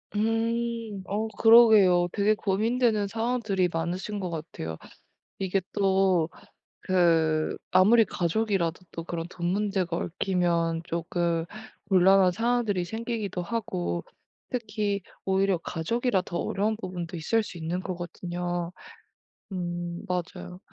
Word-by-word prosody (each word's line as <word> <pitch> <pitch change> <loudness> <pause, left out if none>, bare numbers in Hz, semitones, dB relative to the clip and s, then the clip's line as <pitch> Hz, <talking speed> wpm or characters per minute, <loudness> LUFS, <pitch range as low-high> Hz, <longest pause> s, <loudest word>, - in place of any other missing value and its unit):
음. 225 -1 -1
어 215 +2 -1
그러게요. 215 -6 +7
되게 210 +1 +3
고민되는 215 +1 +1
상황들이 225 -4 0
많으신 180 +5 -3
것 185 -2 -3
같아요. 150 - -6 0.6
이게 190 0 0
또 190 -4 +2 0.6
그 165 -4 +2
아무리 220 +5 +6
가족이라도 185 -2 0
또 165 - -6
그런 165 -1 -4
돈 175 -2 -4
문제가 190 -2 0
얽히면 170 -2 0
쪼끔 170 0 -1 0.4
곤란한 190 -1 +5
상황들이 225 -3 0
생기기도 220 -1 -3
하고 90 - -3 0.5
특히 210 -4 -2 0.2
오히려 190 -1 +2
가족이라 195 +6 -1
더 175 - -4
어려운 210 +2 0
부분도 180 -5 -6
있을 220 +8 +1
수 190 - -9
있는 170 +2 -3
거거든요. 175 -1 -4 0.8
음. 175 -1 -4
맞아요. 180 0 -4
185 Hz, 260 characters per minute, -27 LUFS, 175-215 Hz, 0.8 s, 그러게요